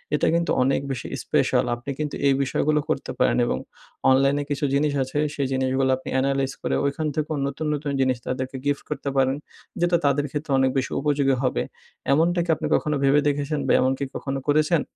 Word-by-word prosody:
এটা - - +1
কিন্তু 170 0 +1
অনেক 135 +1 +1
বেশি 130 - -4 0.2
স্পেশাল। - - +2
আপনি 120 +3 -10
কিন্তু 150 -1 -2
এই 140 - +5
বিষয়গুলো 150 +3 +1
করতে 135 - -2
পারেন, - - +3
এবং 115 - -1 0.5
অনলাইনে 135 +2 +3
কিছু 145 0 -1
জিনিস 145 +1 +2
আছে, 130 +2 -5 0.2
সেই 140 -2 -1
জিনিসগুলা 130 0 +1
আপনি 130 - -8
এনালাইজ 135 0 0
করে, - - -1
ঐখান 140 +3 -1
থেকেও 155 0 -1
নতুন, 140 +3 -4
নতুন 145 0 -3
জিনিস 130 -1 +2
তাদেরকে 130 +1 -3
গিফট 145 -1 0
করতে 145 -1 -3
পারেন। 135 0 +3 0.4
যেটা 175 0 +3
তাদের 140 +1 +2
ক্ষেত্রে 150 0 -4
অনেক 130 0 +3
বেশি 130 - -1
উপযোগী 140 -2 +2
হবে। 125 - +1 0.5
এমনটা 170 +4 +2
কি - - -13
আপনি - - -3
কখনো 150 0 0
ভেবে 140 +1 +5
দেখেছেন? 145 +1 -1
বা - - +4
এমনকি 130 +2 0
কখনো 135 -1 -3
করেছেন? 155 +2 +3
140 Hz, 190 wpm, -24 LUFS, 135-150 Hz, 0.5 s, এই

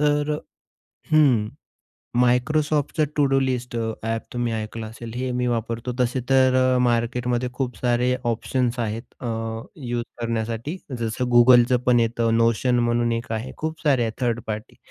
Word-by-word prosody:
तर 150 0 +2
अ - - -3 0.8
हं, 130 -9 +4 0.7
Microsoftचा 145 +5 +2
to 145 - +4
do 135 - +4
list 125 -2 -2
a, 115 -1 -1
app 115 0 -2
तुम्ही 120 -1 -1
ऐकलं 110 0 -4
असेल 115 +1 -9
हे 130 +1 -2
मी 125 - 0
वापरतो. 115 +1 -2
तसे 125 +1 +1
तर 130 -1 +5 0.2
अ, - - +3
मार्केटमध्ये 120 +1 0
खूप 125 -1 -3
सारे 125 0 +1 0.2
ऑप्शन्स 125 +1 -1
आहेत 115 0 -2 0.2
अ, 125 - -5 0.5
यूज 120 -4 -3 0.2
करण्यासाठी 115 +6 -2 0.2
जसं 115 +2 -2
Googleचंपण 125 0 +5
येतं. 115 0 +1
Notion 115 +2 +2
म्हणून 120 0 +1
एक 115 +3 -4
आहे. 115 +4 -4
खूप 160 +1 -4
सारे 140 -5 +3
आहे 115 -1 -1
थर्ड 120 -1 0
पार्टी. 110 0 -5
120 Hz, 155 wpm, -23 LUFS, 115-130 Hz, 0.8 s, तर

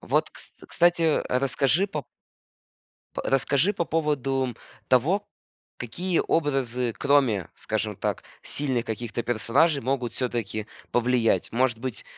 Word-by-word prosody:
Вот, - - 0
кс - - -9 0.2
кстати, 170 -3 +3
расскажи 135 +6 +2
по 155 -7 -4 1.1
по - - -3
расскажи 140 +7 +2
по 170 -4 -1
поводу 135 -6 0 0.3
того, 170 - +3 0.5
какие 170 +9 -1
образы, 130 -6 +1
кроме, 130 - +2
скажем 110 -2 -3
так, - - -2 0.2
сильных 130 -5 -1
каких-то 115 +1 -3
персонажей 135 +6 +2
могут 125 -1 -1
всё-таки 115 -4 -3 0.3
повлиять? 120 -1 +2
Может 120 -1 +1
быть, 130 -1 -5
130 Hz, 115 wpm, -26 LUFS, 120-150 Hz, 1.1 s, кстати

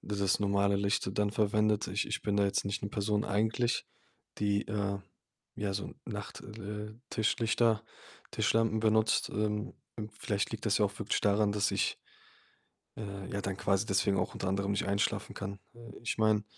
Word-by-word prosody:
dieses 100 -1 +1
normale 100 0 +3
Licht 100 -1 +1
dann 105 -1 +3
verwendet. 105 0 +2
Ich 100 +2 0
ich - - -2
bin 105 -1 0
da 100 - +4
jetzt 100 0 +1
nicht 100 +1 -2
'ne 100 - -2
Person 105 +1 0
eigentlich, 110 +5 +1 0.5
die, 100 0 +1
äh, 100 -2 -1 0.6
ja, 100 -2 -2
so 100 - -4
Nacht - - -6
äh, 105 0 -6 0.2
Tischlichter 110 0 +2 0.5
Tischlampen 115 -1 +2
benutzt. 110 0 +3
Ähm, 105 +3 -1 0.4
vielleicht 105 -1 -1
liegt 110 -2 -5
das 105 -1 +3
ja 105 - +4
auch 100 +1 -8
wirklich 110 - 0
daran, 105 0 +3
dass 105 -1 +2
ich - - +1 1.0
äh, 100 -3 -6
ja 100 - -1
dann 95 -1 -3
quasi 95 -1 +2
deswegen 95 0 +2
auch 90 - 0
unter 95 - -3
anderem 100 +1 0
nicht 100 0 0
einschlafen 100 +2 0
kann. 100 0 -5 0.2
Äh, 120 - -14 0.2
ich 120 - -1
meine, 110 -1 +3
105 Hz, 170 wpm, -32 LUFS, 100-110 Hz, 1.0 s, da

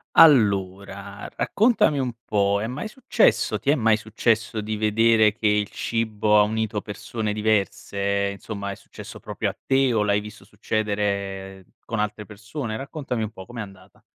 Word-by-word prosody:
Allora, 100 - +3
raccontami 215 - +2
un 125 -2 -1
po': 100 -1 +2
è 110 - -2
mai 130 - -4
successo 210 - +2
ti 140 - -2
è 150 - +5
mai 110 -5 +3
successo 110 0 0
di 110 +1 -3
vedere 110 +1 +4
che 110 - -7
il 105 -1 +2
cibo 110 -2 +1
ha - - +7
unito 110 0 0
persone 105 +1 -4
diverse, 100 -1 0
insomma 100 0 -6
è - - -6
successo - - -11
proprio - - -3
a - - -9
te 135 -2 +3
o 110 - +2
l'hai 105 0 +2
visto 105 +1 -10
succedere 100 -3 -3 0.2
con 115 - -3
altre 105 0 -2
persone? 110 +3 -6
Raccontami 135 -3 -4
un 110 - -2
po', 95 -3 -11
com'è 120 +3 -7
andata? 95 -2 -12
105 Hz, 160 wpm, -24 LUFS, 100-115 Hz, 0.2 s, ha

